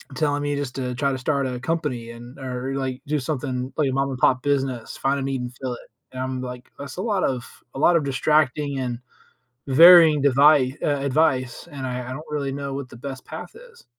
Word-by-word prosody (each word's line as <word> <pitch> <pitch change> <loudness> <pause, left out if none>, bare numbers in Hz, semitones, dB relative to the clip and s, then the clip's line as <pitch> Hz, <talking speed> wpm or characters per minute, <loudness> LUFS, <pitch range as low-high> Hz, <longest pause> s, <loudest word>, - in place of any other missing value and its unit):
telling 145 -2 0
me 145 0 -1
just 140 -3 -4
to, 125 -2 -3
"Try 140 +1 0
to - - -2
start 140 0 0
a 125 -1 -4
company 140 -8 -2
and 120 +3 -12
or, 130 +1 -4
like, 130 -2 -3
do 150 0 0
something, 130 -2 -3
like, 145 -3 +2
a - - -2
mom-and-pop 130 -1 +1
business, 135 -4 -1
find 140 +1 0
a - - -3
need 135 -1 -2
and 125 0 -6
fill 130 -2 -2
it." - - -15 0.2
And 130 0 -6
I'm 130 -1 -3
like, 125 -1 -8
"That's 140 +5 -8
a - - -2
lot 205 -4 0
of 125 -2 -1 0.3
a - - -4
lot 175 +3 +5
of 160 - +3
distracting 140 0 +1
and 120 -2 -3 0.7
varying 160 +1 +8
devi 140 -1 +4
uh, 145 -2 +1
advice." 130 -1 0
And 135 -2 -5
I 125 0 -4
I - - -5
don't 155 +4 -8
really 140 -2 -2
know 140 0 -4
what 135 -2 -5
the 120 - -12
best 135 +1 -7
path - - -8
is. 485 0 -16
135 Hz, 220 wpm, -23 LUFS, 130-145 Hz, 0.7 s, varying